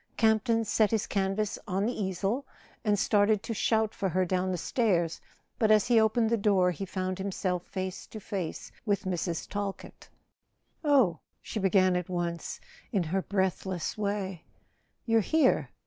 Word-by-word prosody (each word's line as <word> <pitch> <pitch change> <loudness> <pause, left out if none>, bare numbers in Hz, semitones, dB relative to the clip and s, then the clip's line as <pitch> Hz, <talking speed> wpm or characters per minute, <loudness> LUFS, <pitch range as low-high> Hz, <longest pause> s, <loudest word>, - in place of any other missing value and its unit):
Campton 225 +1 +3
set 215 0 +3
his 220 -3 0
canvas 195 +1 -1
on 195 +1 0
the 240 - 0
easel, 200 +7 -2 0.4
and 210 -2 +2
started 205 +1 +3
to 230 - -3
shout 220 0 +1
for 195 - -1
her 185 +1 +1
down 185 +1 0
the 180 - -1
stairs; 175 -5 0 0.4
but 220 - +3
as 215 0 +5
he 235 -2 +6
opened 220 +1 +2
the 230 - +3
door 195 -3 +3
he 195 +3 -5
found 185 0 -3
himself 185 -2 -2
face 185 -1 -5
to 220 - -8
face 190 -5 -5
with 205 -3 0
Mrs. 175 -3 -2
Talkett. 200 -1 -6 0.7
"Oh," 260 - +4 0.2
she 220 - -5
began 190 -1 +3
at 180 -1 -2
once, 175 -2 -3 0.3
in 200 -7 +1
her 180 +4 -1
breathless 190 -2 -1
way, 200 -4 -3 0.6
"you're 225 -1 +3
here? 305 +3 +2
195 Hz, 160 wpm, -29 LUFS, 185-220 Hz, 0.7 s, he